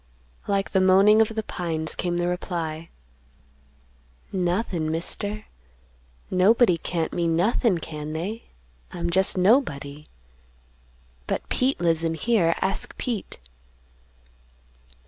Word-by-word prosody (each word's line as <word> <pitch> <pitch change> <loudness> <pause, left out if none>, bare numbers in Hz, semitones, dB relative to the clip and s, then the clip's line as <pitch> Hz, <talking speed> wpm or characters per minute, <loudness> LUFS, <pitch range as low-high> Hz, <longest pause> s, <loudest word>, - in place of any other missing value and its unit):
Like 195 -1 0
the 190 - +3
moaning 195 +4 +6
of 220 - +4
the 220 - -2
pines 160 -5 -3
came 175 -1 -2
the 175 0 0
reply, 165 -2 -4 1.4
"Nothin', 180 -3 -1
Mister, 205 +6 -3 0.9
nobody 185 0 +4
can't 165 -2 -3
mean 170 -2 0
nothin', 205 +2 +2
can 155 -2 -6
they? 200 +9 -4 0.5
I'm 170 0 -3
jest 190 +2 +3
nobody. 150 - +1 1.2
But - - -3
Pete 260 +2 +1
lives 165 -1 +2
in 165 0 0
here; 175 -3 +2
ask 195 +1 -1
Pete." 235 -6 -4
180 Hz, 105 wpm, -24 LUFS, 165-205 Hz, 1.4 s, moaning